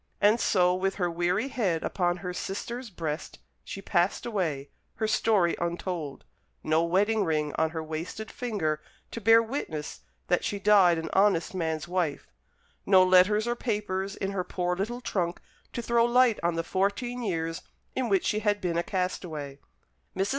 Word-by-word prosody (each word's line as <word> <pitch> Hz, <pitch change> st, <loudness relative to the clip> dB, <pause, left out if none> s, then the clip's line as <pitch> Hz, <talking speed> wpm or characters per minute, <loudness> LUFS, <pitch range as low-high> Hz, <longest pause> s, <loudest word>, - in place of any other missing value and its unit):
And 210 Hz, +3 st, +4 dB
so, 180 Hz, -5 st, +3 dB
with 190 Hz, +1 st, -1 dB
her 175 Hz, -3 st, 0 dB
weary 180 Hz, +9 st, 0 dB
head 190 Hz, -11 st, 0 dB
upon 175 Hz, -2 st, 0 dB
her 180 Hz, -, -3 dB
sister's 235 Hz, +7 st, -5 dB
breast, 160 Hz, -4 st, -5 dB, 0.3 s
she 195 Hz, -, -7 dB
passed 175 Hz, 0 st, +1 dB
away, 165 Hz, -, -2 dB, 0.2 s
her 220 Hz, -, -1 dB
story 205 Hz, -5 st, +2 dB
untold, 170 Hz, -4 st, -3 dB, 0.4 s
no 160 Hz, +1 st, +2 dB
wedding 205 Hz, +5 st, +2 dB
ring 155 Hz, -4 st, 0 dB
on 160 Hz, 0 st, +1 dB
her 160 Hz, 0 st, -4 dB
wasted 165 Hz, +8 st, -5 dB
finger 175 Hz, -11 st, -2 dB, 0.3 s
to 230 Hz, -, -6 dB
bear 225 Hz, +2 st, +6 dB
witness 190 Hz, -, -5 dB, 0.2 s
that 180 Hz, -, +1 dB
she 205 Hz, -, -2 dB
died 195 Hz, -4 st, +5 dB
an 160 Hz, -1 st, -4 dB
honest 195 Hz, -4 st, +3 dB
man's 160 Hz, -3 st, -2 dB
wife; 175 Hz, -5 st, -1 dB, 0.6 s
no 185 Hz, -2 st, +6 dB
letters 185 Hz, +4 st, +5 dB
or 240 Hz, 0 st, 0 dB
papers 205 Hz, -4 st, -2 dB
in 195 Hz, -, -3 dB
her 190 Hz, -2 st, -1 dB
poor 180 Hz, 0 st, -2 dB
little 230 Hz, +7 st, -3 dB
trunk 180 Hz, -7 st, -2 dB, 0.3 s
to 240 Hz, -, -3 dB
throw 235 Hz, 0 st, +3 dB
light 240 Hz, -1 st, +4 dB
on 170 Hz, 0 st, 0 dB
the 165 Hz, -, -1 dB
fourteen 200 Hz, +8 st, -1 dB
years 165 Hz, -5 st, -2 dB, 0.3 s
in 255 Hz, -3 st, -1 dB
which 195 Hz, -2 st, +2 dB
she 210 Hz, -, +1 dB
had 205 Hz, -1 st, +1 dB
been 170 Hz, -3 st, -1 dB
a -, -, 0 dB
castaway. 160 Hz, -7 st, -3 dB, 0.6 s
Mrs. 195 Hz, +1 st, +1 dB
185 Hz, 170 wpm, -28 LUFS, 170-210 Hz, 0.6 s, bear